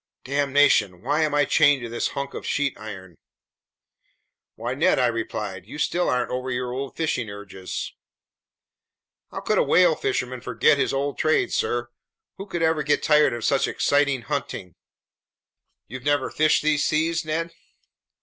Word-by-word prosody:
Damnation! 140 -9 +2
Why 145 +5 +1
am 155 -2 +1
I 145 0 +4
chained 140 -1 +4
to - - -4
this 120 +1 -1
hunk 140 0 -3
of - - -6
sheet 145 -2 -1
iron!" 95 -4 -9 1.4
"Why, 120 +3 -4
Ned!" 145 +5 +2
I 130 - +3
replied. 105 -5 -3
"You 135 - -9
still 175 +3 0
aren't 125 -1 0
over 130 +1 -3
your 125 0 -2
old 130 0 -5
fishing 130 -8 -1
urges?" 100 -2 -7 1.4
"How - - -6
could - - +1
a - - +4
whale 180 -2 +4
fisherman 130 -3 -2
forget 125 +4 +2
his - - +1
old 140 +1 -2
trade, 155 0 +1
sir? 120 0 -1 0.5
Who 195 +1 -8
could 170 -3 -3
ever 160 -1 +2
get 150 - +1
tired 150 -3 +4
of 120 -1 -4
such 140 - +2
exciting 140 -3 +1
hunting?" 115 - -4 1.1
"You've 130 +3 -8
never 145 0 0
fished 155 -1 +2
these 150 -1 +2
seas, 165 +2 +1
Ned?" 165 +2 -3
140 Hz, 160 wpm, -24 LUFS, 120-150 Hz, 1.4 s, I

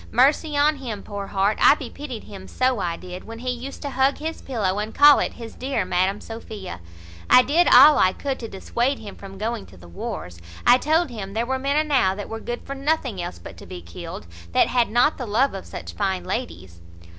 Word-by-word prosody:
Mercy 290 +4 +3
on 295 +1 +3
him, 230 -7 -6
poor 200 -1 -6
heart! 200 +2 0
I - - +7
bepitied 265 -3 -7
him, 190 -2 -11
so 255 -2 0
I 170 -3 -2
did, 180 0 -9
when 225 +1 -9
he 250 +2 -3
used 250 +4 -7
to 285 - -4
hug 265 +1 +2
his 320 +2 -5
pillow, 205 -7 -1
and 215 +1 -4
call 290 0 +8
it - - -1
his 230 -2 -9
dear 260 -6 -2
Madam 185 +2 0
Sophia. 215 - -8 0.5
I 250 - +8
did 335 +7 +3
all 300 0 +8
I 185 - +5
could 270 +6 -4
to 230 - -6
dissuade 240 +7 -1
him 205 -2 -10
from 195 -1 -11
going 220 +1 -3
to 95 - -16
the 85 0 -14
wars: 85 0 -7 0.2
I 245 +1 +7
told 315 +1 +1
him 200 -4 -7
there 225 +2 -1
were 265 +1 -1
men 280 +2 0
enow 280 -11 +2
that 205 - -7
were 225 - -5
good 240 +2 -5
for 275 - -5
nothing 275 - -1
else 130 - -6
but 85 0 -11
to - - -12
be 90 -1 -8
killed, 85 0 -8 0.3
that - - +4
had 245 -2 +2
not 245 +8 +2
the 250 - -4
love 245 +7 +2
of 195 - -7
such - - -8
fine 190 -3 -1
ladies." 85 0 -5
230 Hz, 225 wpm, -23 LUFS, 195-275 Hz, 0.5 s, call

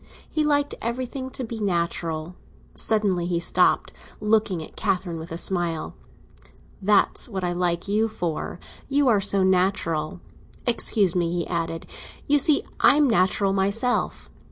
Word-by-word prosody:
He 310 - -1
liked 290 -1 +1
everything 255 +3 -3
to 260 - -5
be 230 -1 -5
natural. 170 -3 -2 0.4
Suddenly 200 -6 0
he 175 -1 0
stopped, 170 - +2 0.3
looking 210 -4 +1
at - - -13
Catherine 185 -5 -1
with 160 - -8
his 165 +1 -3
smile. 175 -4 -1 0.9
"That's 205 +4 +2
what 190 -4 -4
I 175 - 0
like 175 0 0
you 215 +3 +2
for; 175 -7 -4 0.3
you 285 0 +2
are 210 -4 +3
so 200 -1 +2
natural! 180 -4 +1 0.5
Excuse 215 -6 +2
me," 170 -2 +1
he 175 -1 -1
added; 165 -1 -3 0.4
"you 290 0 +4
see 285 +1 +4 0.2
I - - +6
am 295 -1 +4
natural 195 -2 +2
myself!" 200 +6 0
195 Hz, 145 wpm, -24 LUFS, 175-225 Hz, 0.9 s, I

